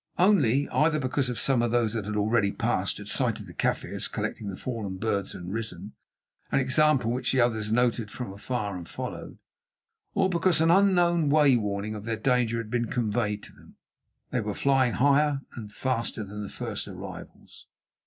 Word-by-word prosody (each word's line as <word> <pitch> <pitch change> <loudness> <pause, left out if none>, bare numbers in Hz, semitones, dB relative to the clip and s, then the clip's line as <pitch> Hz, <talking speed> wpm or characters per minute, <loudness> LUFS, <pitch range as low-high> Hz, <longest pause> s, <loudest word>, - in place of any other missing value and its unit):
Only, 145 - +4
either 155 0 +2
because 130 -2 -1
some 135 -3 +2
of 120 - +1
those 115 -2 +1
that 110 -3 -3
had 105 +1 -3
already 105 0 +2
passed - - 0
had - - -9
sighted - - 0
the - - -12
Kaffirs - - -1
collecting 105 - -4
the 95 - -5
fallen 105 -6 -4
birds 100 -1 -1
and 90 +1 -6
risen—an 115 +4 -6
example 135 -2 +3
which 125 +1 0
the 130 - +2
others 110 -3 +1
noted 120 -2 +1
from 110 -3 -6
afar 105 -1 -3
and 85 -2 -8
followed—or - - -6
because 175 -2 +2
in 165 +1 +4
an 175 - +7
unknown 175 -4 +2
way 145 -3 +5
warning 105 -1 -2
of 105 -1 -7
their 115 -1 -2
danger 120 0 +1
had 115 -2 -5
been 120 -1 +1
conveyed 105 -3 -1
to - - -12
them, - - -19 0.6
they 125 - 0
were 105 -1 -3
flying 135 -3 +2
higher 145 +1 +3
and 105 -4 -8
faster 115 -2 -2
than 105 +1 -7
the 100 - -6
first - - -4
arrivals. - - -10
120 Hz, 175 wpm, -27 LUFS, 105-135 Hz, 0.6 s, an